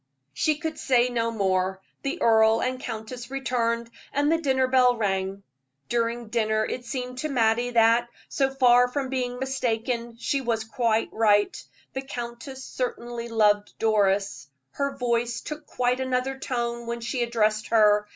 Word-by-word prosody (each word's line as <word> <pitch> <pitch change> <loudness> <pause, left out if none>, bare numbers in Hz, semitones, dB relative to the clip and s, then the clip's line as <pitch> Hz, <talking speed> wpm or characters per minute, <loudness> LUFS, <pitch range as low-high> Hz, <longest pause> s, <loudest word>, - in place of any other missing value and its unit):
She 305 - +1
could 320 +1 -4
say 250 -2 +3
no 230 -2 0
more; 190 -3 0 0.2
the 285 +6 -3
earl 220 0 +5
and 255 +1 -1
countess 240 +1 -6
returned, 235 -3 -1 0.2
and 290 +2 +1
the 330 - +2
dinner 265 -3 +2
bell 255 -1 +4
rang. 195 -2 -1 0.5
During 235 -1 -1
dinner 220 -1 +1
it 245 - -5
seemed 250 +1 -5
to 310 - -2
Mattie 240 -2 +2
that, 235 0 +4 0.2
so 270 -1 +1
far 250 -2 +5
from 265 +1 -3
being 250 -2 -2
mistaken, 235 -2 -2
she 275 +4 -1
was 230 -3 -1
quite 225 0 0
right 205 -2 +3 0.4
the 265 - -3
countess 260 +1 -7
certainly 240 -2 -4
loved 210 -2 +2
Doris; 200 -8 +1 0.2
her 280 -1 -2
voice 235 -1 0
took 300 0 -7
quite 250 +1 0
another 260 0 -1
tone 235 -2 -3
when 235 0 -3
she 240 +2 -2
addressed 220 -2 +1
her. 210 -2 +4
235 Hz, 150 wpm, -26 LUFS, 225-255 Hz, 0.5 s, earl